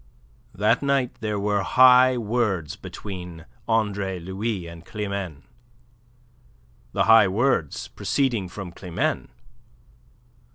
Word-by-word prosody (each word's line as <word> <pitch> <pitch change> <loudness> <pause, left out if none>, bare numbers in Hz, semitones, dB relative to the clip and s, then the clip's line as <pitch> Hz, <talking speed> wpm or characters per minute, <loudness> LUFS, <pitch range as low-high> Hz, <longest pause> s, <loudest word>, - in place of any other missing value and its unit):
That 105 +4 +2
night 140 -3 +1
there, 105 -2 -2
were 100 0 0
high 130 +4 +6
words 105 -8 -1
between 90 -5 -8 0.2
Andre 100 -4 0
Louis 95 +2 -4
and 85 0 -10
Climene, 100 -7 -5 1.5
the - - +1
high 110 -2 +7
words 100 - 0
proceeding 120 -10 -1
from 95 -1 -7
Climene. 90 0 -2
100 Hz, 95 wpm, -24 LUFS, 90-115 Hz, 1.5 s, high